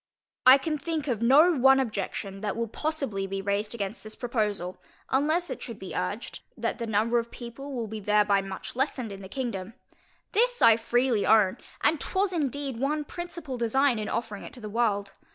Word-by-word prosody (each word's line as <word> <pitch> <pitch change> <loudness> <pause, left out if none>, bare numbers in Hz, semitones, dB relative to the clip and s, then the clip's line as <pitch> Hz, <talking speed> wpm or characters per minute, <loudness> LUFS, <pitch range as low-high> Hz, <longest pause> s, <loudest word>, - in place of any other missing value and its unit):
I 260 +1 +11
can 305 +2 -2
think 315 -1 -3
of 235 -5 -1
no 290 +9 +6
one 270 0 +6
objection, 200 -4 -3
that 210 0 -2
will 230 0 -1
possibly 270 -8 -2
be 195 0 -3
raised 200 +3 -1
against 205 0 -4
this 215 0 -4
proposal, 210 -7 -2 0.3
unless 310 +6 +1
it - - -5
should - - -7
be - - -8
urged, - - -3 0.2
that - - -2
the 235 - -3
number 220 +3 +2
of 230 0 -5
people 260 +4 -8
will 235 -2 -2
be 220 +1 -5
thereby 205 -1 +3
much 195 +3 -7
lessened 255 -4 -1
in 195 0 -8
the 190 - -9
kingdom. 225 -5 -4 0.6
This - - +2
I 225 - +7
freely 240 -1 +1
own, 215 -1 +4 0.2
and 305 0 +2
was 380 0 +2
indeed 280 -5 -2
one 295 +3 0
principal 340 -6 -6
design 245 +1 +2
in 210 - -3
offering 225 -3 -3
it - - -10
to 255 - -9
the 215 -2 -7
world. 205 -4 0
235 Hz, 190 wpm, -27 LUFS, 210-275 Hz, 0.6 s, I